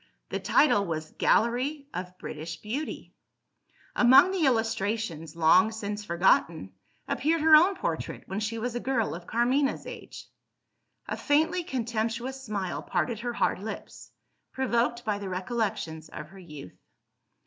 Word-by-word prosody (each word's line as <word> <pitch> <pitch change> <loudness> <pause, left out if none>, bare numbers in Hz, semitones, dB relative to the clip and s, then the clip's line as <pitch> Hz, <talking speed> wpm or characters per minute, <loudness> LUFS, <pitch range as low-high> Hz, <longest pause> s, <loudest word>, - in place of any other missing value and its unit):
The - - -2
title 205 -10 +3
was 155 -1 -4
"Gallery 260 +6 +2
of 180 0 -6
British 160 +1 -6
Beauty." 250 - -5 0.8
Among 260 +10 +7
the 355 -6 +2
illustrations 225 - -1
long 170 +7 +5
since 210 -1 -4
forgotten 170 - +2 0.4
appeared 315 +4 +1
her 315 0 +8
own 360 +6 +6
portrait, - - -4
when 190 +2 -4
she 215 +1 -2
was 240 +2 -3
a 240 - -2
girl 240 -6 0
of 170 +1 -9
Carmina's 255 +5 +1
age. - - -9 0.8
A - - -2
faintly 320 +5 +1
contemptuous 235 0 -3
smile 200 -6 -3
parted 185 +5 -1
her 240 +1 -3
hard 230 - 0
lips, 215 +3 -8 0.4
provoked 240 -2 0
by 210 -2 -1
the 200 -2 -5
recollections 185 -5 -3
of 150 0 -8
her 195 +2 -14
youth. 150 - -11
225 Hz, 135 wpm, -28 LUFS, 185-255 Hz, 0.8 s, her